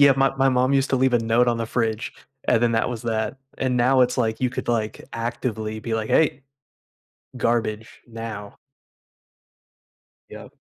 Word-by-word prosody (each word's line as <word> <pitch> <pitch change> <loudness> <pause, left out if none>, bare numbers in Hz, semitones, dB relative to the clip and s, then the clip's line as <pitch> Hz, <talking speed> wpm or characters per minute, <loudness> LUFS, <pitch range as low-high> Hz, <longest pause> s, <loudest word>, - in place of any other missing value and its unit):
Yeah, 140 -1 +8
my 135 0 +2
my 135 0 +3
mom 130 +1 +2
used 135 -1 +2
to 135 - +3
leave 130 0 +2
a - - +5
note 115 +2 +2
on 120 - +1
the 115 - -2
fridge, 115 -2 -1 0.3
and 115 - +2
then 120 -1 +3
that 115 +1 +1
was 120 -2 -5
that. 110 +3 -2 0.2
And 130 -2 0
now, 130 +2 +4
it's, 125 +1 +3
like 110 -2 0
you 130 - +2
could, - - -5
like, 110 -3 -1
actively 115 -2 -3
be, 115 0 -3
like, 110 -1 -2
"Hey. 145 -4 +2 1.0
Garbage 110 -2 -1
now." 115 -3 -7 1.7
Yep. - - -11
120 Hz, 175 wpm, -23 LUFS, 110-130 Hz, 1.7 s, Yeah